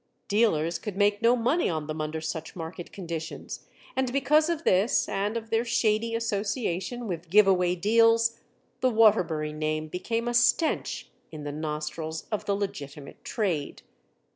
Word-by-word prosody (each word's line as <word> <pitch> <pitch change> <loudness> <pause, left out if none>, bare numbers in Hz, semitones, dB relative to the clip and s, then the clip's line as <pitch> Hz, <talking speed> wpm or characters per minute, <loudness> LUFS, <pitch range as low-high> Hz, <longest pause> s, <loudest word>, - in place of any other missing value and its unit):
Dealers 170 -7 +2
could 205 -3 -6
make 205 +1 +2
no 235 +1 +5
money 250 +8 +1
on 155 -3 -2
them 155 +1 -4
under 155 +1 -3
such 160 0 -5
market 170 +1 -7
conditions 165 -4 -6 0.3
and, 260 -1 0
because 295 +4 +3
of 335 -1 -2
this 195 - +3
and 205 +3 -1
of 225 -1 -7
their 225 +1 +2
shady 230 -1 +1
association 220 0 -2
with 175 -2 -5
give 210 +3 +6
away 180 -2 +3
deals, 230 +4 +3 0.4
the 255 - +3
Waterbury 180 -10 +3
name 155 0 -2
became 230 +7 -2
a 240 - 0
stench 240 +7 +1 0.2
in 155 -2 -8
the 145 - -4
nostrils 155 +1 -4
of 215 - -2
the 200 - +1
legitimate 145 -8 -6
trade. 175 - -2
200 Hz, 155 wpm, -27 LUFS, 160-230 Hz, 0.4 s, give